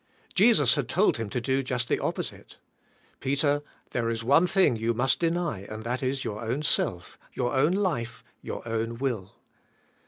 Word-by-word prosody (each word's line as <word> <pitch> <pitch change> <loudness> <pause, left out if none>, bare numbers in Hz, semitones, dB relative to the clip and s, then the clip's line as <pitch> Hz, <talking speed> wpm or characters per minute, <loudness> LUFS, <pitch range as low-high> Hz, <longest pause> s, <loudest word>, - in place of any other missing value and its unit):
Jesus - - +5
had - - -1
told - - +3
him 115 -2 -4
to 125 - -1
do 130 +3 0
just 125 -2 -2
the - - +1
opposite. - - -4 0.6
"Peter, 145 +1 +1 0.3
there 115 -2 0
is 115 0 -2
one 145 +9 +5
thing 185 - +3
you 115 +1 -1
must 125 +3 +2
deny 170 - 0
and 110 0 -6
that 125 +2 -2
is 130 0 -1
your 105 +2 -4
own 125 +7 -2
self, 90 - -1
your 125 -1 -1
own 145 +6 +3
life, 165 - -1 0.2
your - - -6
own 115 +1 -2
will." 115 -8 -3
125 Hz, 175 wpm, -27 LUFS, 115-145 Hz, 0.6 s, Jesus